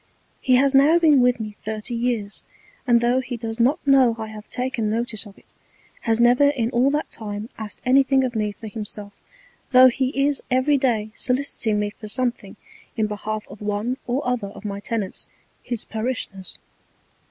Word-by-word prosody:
He 255 - +3
has 275 +2 +4
now 285 +5 +6
been 305 -6 +5
with 245 -1 +3
me 215 -1 -4
thirty 215 +2 -4
Years; 230 -4 -2 0.5
and 235 -1 +4
tho' 240 +2 +2
he 255 -2 -5
does 225 0 -5
not 260 +6 +3
know 265 -4 +5
I 220 -1 -5
have 215 -1 -10
taken 250 -4 -2
Notice 225 -1 -2
of 200 - -15
it, - - -16 0.5
has 225 -1 0
never 245 +4 +5
in 245 -5 -1
all 250 +2 +3
that 295 +2 -2
time 210 0 -5
asked 210 -3 -6
anything 265 +1 +4
of 250 -2 -2
me 210 -1 0
for 220 - -12
himself, 210 -1 -6 0.5
tho' 255 0 +8
he 255 +1 0
is 280 0 +2
every 265 +3 +2
Day 220 -5 0
soliciting 250 -4 0
me 205 0 -1
for 215 0 -11
something 245 +2 -2 0.4
in 220 - +2
behalf 210 +1 -4
of 200 +2 -13
one 210 +5 -2
or 250 +2 -1
other 250 -5 -1
of 200 +1 -12
my 200 -1 -4
Tenants 210 -2 -2 0.3
his 240 -3 -4
Parishioners. 220 -5 -4
235 Hz, 180 wpm, -23 LUFS, 215-255 Hz, 0.5 s, tho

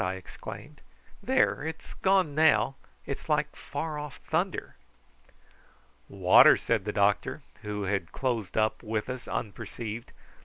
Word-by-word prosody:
I 90 +1 -1
exclaimed. 95 - -10 0.4
"There! - - +2
it 160 0 -4
is - - -12
gone 190 -5 +2
now. 150 -4 +4 0.3
It - - -3
is - - -16
like - - +1
far 155 -2 -4
off 150 -3 -7
thunder." 175 +3 -1 1.3
"Water," - - +7
said 110 -5 0
the 105 - -1
doctor, 100 0 +1 0.2
who 105 -1 -4
had 95 -3 -1
closed 120 -8 -2
up 110 0 +1
with 110 +1 -3
us 130 -1 -7
unperceived. 110 +1 -5
115 Hz, 140 wpm, -28 LUFS, 105-150 Hz, 1.3 s, Water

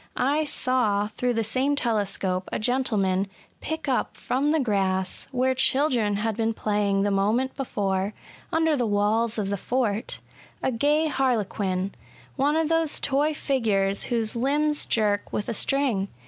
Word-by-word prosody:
I 290 +4 +1
saw, 245 -8 +1
through 245 +3 -1
the 225 - +1
same 260 +6 +1
telescope, 195 -6 -1
a - - -1
gentleman 215 -6 +1 0.3
pick 320 0 -4
up 260 -2 -1
from 275 +4 0
the 315 +1 +2
grass, 190 -6 0
where 260 0 +1
children 260 -5 +2
had 215 +1 -1
been 225 0 -1
playing 205 -2 0
the 205 - +1
moment 215 +7 +1
before, 200 -6 -2 0.4
under 320 -1 +2
the 245 -4 0
walls 215 +3 +1
of 200 -2 -1
the 200 - -1
fort, 230 -1 -1 0.4
a - - +1
gay 295 +6 +2
harlequin 205 -8 -1 0.2
— - - -23
one 285 +2 +2
of 320 -1 +2
those 325 -1 +2
toy 290 +2 +1
figures 205 -9 +1
whose 230 -3 -1
limbs 290 +5 +1
jerk 205 -2 +1
with 205 - -3
a - - -2
string. 245 -5 +1
230 Hz, 155 wpm, -25 LUFS, 205-270 Hz, 0.4 s, the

